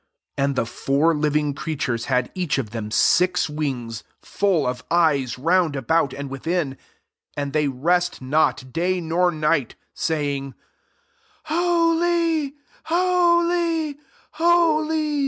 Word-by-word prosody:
8 140 Hz, -, -3 dB
And 140 Hz, 0 st, +1 dB
the 120 Hz, -, 0 dB
four 140 Hz, +7 st, +1 dB
living 150 Hz, -1 st, 0 dB
creatures 135 Hz, -6 st, -3 dB
had 125 Hz, -2 st, 0 dB
each 175 Hz, -6 st, -1 dB
of 115 Hz, -6 st, -3 dB
them 110 Hz, -2 st, -5 dB
six 180 Hz, +10 st, +3 dB
wings, 130 Hz, -7 st, -4 dB, 0.2 s
full 190 Hz, -7 st, 0 dB
of 125 Hz, 0 st, -3 dB
eyes 150 Hz, -8 st, +2 dB
round 165 Hz, +2 st, +2 dB
about 140 Hz, +2 st, +1 dB
and 140 Hz, +1 st, -6 dB
within: 135 Hz, +1 st, -2 dB, 0.6 s
and 140 Hz, -1 st, -3 dB
they 150 Hz, -1 st, +2 dB
rest 175 Hz, +7 st, 0 dB
not 130 Hz, -2 st, 0 dB
day 180 Hz, +4 st, 0 dB
nor 175 Hz, +2 st, +1 dB
night, 155 Hz, -5 st, 0 dB, 0.2 s
saying, 140 Hz, -4 st, -2 dB, 0.5 s
" -, -, -38 dB
Holy, 335 Hz, -2 st, +1 dB, 0.3 s
holy, 340 Hz, -3 st, +1 dB, 0.3 s
holy. 335 Hz, -1 st, +3 dB
160 Hz, 120 wpm, -22 LUFS, -, 0.6 s, six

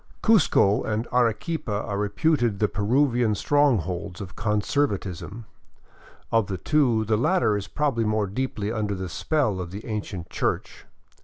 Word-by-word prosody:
Cuzco 155 Hz, -, +4 dB
and 110 Hz, +1 st, -2 dB
Arequipa 115 Hz, -1 st, 0 dB
are 105 Hz, -, -4 dB
reputed 115 Hz, -, +1 dB
the 105 Hz, -, +2 dB
Peruvian 120 Hz, +2 st, +1 dB
strongholds 100 Hz, -, +1 dB
of 100 Hz, -2 st, -8 dB
con 105 Hz, -2 st, 0 dB
servatism. 100 Hz, -, -2 dB, 0.9 s
Of 115 Hz, -4 st, +2 dB
the 95 Hz, -, -3 dB
two, 120 Hz, -, +2 dB
the 110 Hz, 0 st, +1 dB
latter 125 Hz, -, +2 dB
is 100 Hz, -1 st, -4 dB
probably 135 Hz, -3 st, 0 dB
more 110 Hz, -1 st, +1 dB
deeply 105 Hz, 0 st, -3 dB
under 105 Hz, -3 st, -2 dB
the 95 Hz, -1 st, -5 dB
spell 110 Hz, -, 0 dB
of 90 Hz, -, -6 dB
the 100 Hz, +4 st, -8 dB
ancient 100 Hz, -6 st, -5 dB
church. -, -, -3 dB
110 Hz, 145 wpm, -25 LUFS, 100-125 Hz, 0.9 s, Cuzco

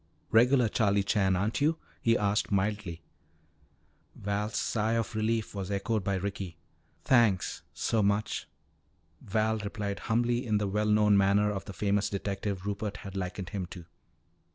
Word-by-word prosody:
"Regular 125 Hz, +2 st, +5 dB
Charlie 100 Hz, -2 st, +2 dB
Chan, 95 Hz, -1 st, +2 dB
aren't 100 Hz, +8 st, -1 dB
you?" 155 Hz, +3 st, +3 dB, 0.2 s
he 115 Hz, 0 st, +3 dB
asked 105 Hz, +1 st, 0 dB
mildly. 100 Hz, -4 st, -1 dB, 1.1 s
Val's 105 Hz, +2 st, -2 dB
sigh 110 Hz, 0 st, 0 dB
of 115 Hz, -1 st, -1 dB
relief 110 Hz, 0 st, 0 dB
was 100 Hz, -2 st, -4 dB
echoed 100 Hz, +1 st, -1 dB
by 100 Hz, 0 st, 0 dB
Ricky. 95 Hz, -2 st, -4 dB, 0.5 s
"Thanks 115 Hz, -8 st, +3 dB
so 110 Hz, -, 0 dB
much," 100 Hz, +1 st, 0 dB, 0.7 s
Val 110 Hz, +2 st, 0 dB
replied 100 Hz, -1 st, -4 dB
humbly 120 Hz, +2 st, +2 dB
in 110 Hz, -3 st, +1 dB
the 105 Hz, -1 st, 0 dB
well 105 Hz, +2 st, 0 dB
known 105 Hz, -1 st, +5 dB
manner 100 Hz, +1 st, +3 dB
of 100 Hz, -2 st, -4 dB
the 100 Hz, -, -7 dB
famous 100 Hz, +3 st, +1 dB
detective 100 Hz, -1 st, -3 dB
Rupert 105 Hz, 0 st, -3 dB
had 100 Hz, 0 st, -7 dB
likened 90 Hz, -1 st, -4 dB
him 95 Hz, -4 st, -4 dB
to. 85 Hz, -1 st, -10 dB
105 Hz, 150 wpm, -29 LUFS, 100-110 Hz, 1.1 s, Regular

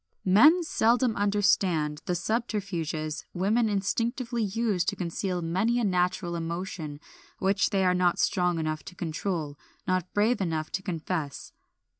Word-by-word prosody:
Men 300 Hz, -, +6 dB
seldom 240 Hz, -5 st, +2 dB
understand 190 Hz, -7 st, +1 dB
the 180 Hz, -, 0 dB
subterfuges 175 Hz, -7 st, -2 dB
women 215 Hz, +5 st, +2 dB
instinctively 235 Hz, +4 st, -1 dB
use 210 Hz, -3 st, 0 dB
to -, -, 0 dB
conceal 180 Hz, 0 st, -3 dB
many 200 Hz, +9 st, +1 dB
a -, -, 0 dB
natural 180 Hz, -2 st, 0 dB
emotion 165 Hz, -3 st, -4 dB, 0.4 s
which 195 Hz, +1 st, +2 dB
they 195 Hz, -2 st, +1 dB
are 180 Hz, -, +4 dB
not 180 Hz, -1 st, +2 dB
strong 180 Hz, -2 st, +1 dB
enough 155 Hz, -1 st, -2 dB
to 180 Hz, -, -10 dB
control, 160 Hz, -3 st, -3 dB, 0.3 s
not 185 Hz, -1 st, 0 dB
brave 215 Hz, +2 st, +2 dB
enough 160 Hz, -4 st, -2 dB
to 190 Hz, -, -2 dB
confess. 165 Hz, -5 st, -4 dB
185 Hz, 135 wpm, -27 LUFS, 170-210 Hz, 0.4 s, Men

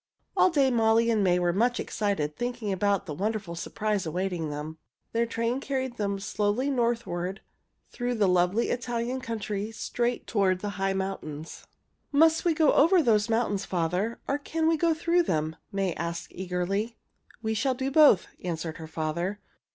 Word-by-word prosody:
All -, -, +5 dB
day 280 Hz, -6 st, +3 dB
Molly 230 Hz, 0 st, +3 dB
and 215 Hz, -3 st, +2 dB
May 180 Hz, -2 st, +3 dB
were 175 Hz, -1 st, +1 dB
much 240 Hz, +6 st, +2 dB
excited 175 Hz, -8 st, -1 dB
thinking 240 Hz, -4 st, -2 dB
about 200 Hz, +1 st, +1 dB
the 155 Hz, -, -5 dB
wonderful 200 Hz, +1 st, -2 dB
surprise 205 Hz, +4 st, -2 dB
awaiting 175 Hz, -1 st, -2 dB
them. 150 Hz, +2 st, -6 dB, 0.3 s
Their 230 Hz, +1 st, +1 dB
train 230 Hz, +2 st, -1 dB
carried 260 Hz, -3 st, -3 dB
them 200 Hz, -1 st, -1 dB
slowly 215 Hz, +6 st, 0 dB
northward 230 Hz, -7 st, -1 dB, 0.5 s
through 245 Hz, 0 st, -2 dB
the 210 Hz, -3 st, +3 dB
lovely 180 Hz, +5 st, +2 dB
Italian 240 Hz, +1 st, -2 dB
country 215 Hz, -3 st, -3 dB
straight 240 Hz, +2 st, -2 dB
toward 190 Hz, -4 st, +1 dB
the 205 Hz, -, -2 dB
high 195 Hz, 0 st, +2 dB
mountains. 170 Hz, -5 st, -5 dB, 0.4 s
"Must 320 Hz, +2 st, +4 dB
we 335 Hz, -2 st, +3 dB
go 310 Hz, -2 st, +4 dB
over 335 Hz, +4 st, +5 dB
those 215 Hz, -3 st, +3 dB
mountains, 225 Hz, -3 st, +1 dB
father, 180 Hz, +6 st, -1 dB
or 280 Hz, +1 st, 0 dB
can 320 Hz, +2 st, -1 dB
we 325 Hz, -, +4 dB
go 330 Hz, +1 st, +2 dB
through 340 Hz, +2 st, +2 dB
them?" 160 Hz, -, -1 dB, 0.2 s
May 195 Hz, -3 st, 0 dB
asked 170 Hz, +1 st, -4 dB
eagerly. 190 Hz, +5 st, -2 dB, 0.5 s
"We 220 Hz, 0 st, 0 dB
shall 260 Hz, +4 st, +1 dB
do 265 Hz, +1 st, -2 dB
both," 285 Hz, -, +6 dB, 0.2 s
answered 165 Hz, -2 st, -3 dB
her 160 Hz, -, -8 dB
father. 165 Hz, +5 st, -2 dB
210 Hz, 165 wpm, -27 LUFS, 180-245 Hz, 0.5 s, both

